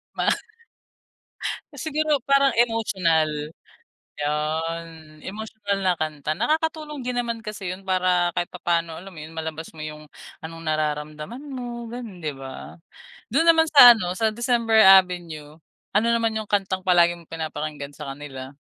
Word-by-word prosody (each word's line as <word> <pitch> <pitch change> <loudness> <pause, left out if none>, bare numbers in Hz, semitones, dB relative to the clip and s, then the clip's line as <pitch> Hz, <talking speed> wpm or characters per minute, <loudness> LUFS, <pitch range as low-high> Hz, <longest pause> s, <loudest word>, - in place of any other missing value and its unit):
Ma - - +2 1.4
Siguro 300 0 0
parang 275 +1 +3
emotional. 195 -9 +2 0.9
'Yon, 155 +1 -3
emotional 205 0 -4
na 180 - +4
kanta. 155 -1 -3
Nakakatulong 310 - -1
din 250 -1 -1
naman 230 -1 -4
kasi 210 -3 -5
'yun 185 +2 -6
para 180 -2 +2
kahit 175 - -1
papaano 170 -2 -1
alam 190 +4 -10
mo 155 - -10
'yun, 160 +1 -10
malabas 160 0 -5
mo 155 - -7
'yung 150 0 -9 0.3
anong 165 +1 -8
nararamdaman 155 - -3
mo 240 -2 -6
gano'n, 235 -6 -7
'di 150 - -1
ba? 135 +5 -10 0.5
Do'n 295 +8 +3
naman 325 -1 +6
sa 250 -5 +11
ano, 180 -5 -3
sa 220 -1 +2
December 230 -1 +3
Avenue, 170 -5 +3 0.4
Ano 220 +3 +3
naman 230 -1 +2
'yung 220 -1 -4
kantang 190 -2 0
palagi 175 -2 +5
mong 170 -2 -17
pinapakinggan 155 -3 -5
sa 140 -2 -7
kanila? 135 -2 -9
180 Hz, 140 wpm, -24 LUFS, 155-230 Hz, 1.4 s, sa